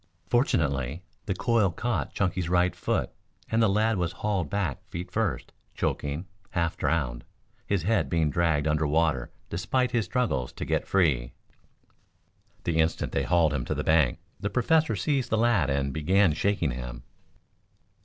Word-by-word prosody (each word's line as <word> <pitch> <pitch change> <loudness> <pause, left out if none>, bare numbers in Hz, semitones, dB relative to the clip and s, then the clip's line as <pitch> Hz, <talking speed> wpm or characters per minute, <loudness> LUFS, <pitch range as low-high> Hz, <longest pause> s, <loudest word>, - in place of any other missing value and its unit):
Fortunately 75 - 0 0.2
the 95 - 0
coil 115 -1 +2
caught 105 +2 -2
Chunky's 90 -3 0
right 90 0 +2
foot - - -1 0.4
and 115 0 +3
the 110 - +4
lad 110 +2 +2
was 85 -2 -1
hauled 100 -7 -1
back 95 -9 -2
feet 85 +2 -6
first, - - -1 0.2
choking, 75 +5 -2 0.2
half 85 -1 -1
drowned, 65 -8 -1 0.4
his 100 -5 0
head 95 -8 +1
being 80 -2 +1
dragged 80 -2 +1
under 75 0 +1
water 75 -5 +1 0.2
despite 125 +9 0
his 120 -4 +1
struggles 70 - -1
to - - -5
get - - -1
free. 70 -11 +2 1.3
The 80 -1 0
instant 80 +1 +1
they - - 0
hauled 85 -4 +3
him 65 -4 -1
to - - -2
the - - -2
bank 80 -6 +3 0.2
the 105 +1 -2
Professor 125 +3 +2
seized 130 +7 0
the 110 - +1
lad 110 - +3
and 70 0 0
began 95 +3 +3
shaking 85 -2 0
him. - - -6
85 Hz, 155 wpm, -27 LUFS, 75-105 Hz, 1.3 s, the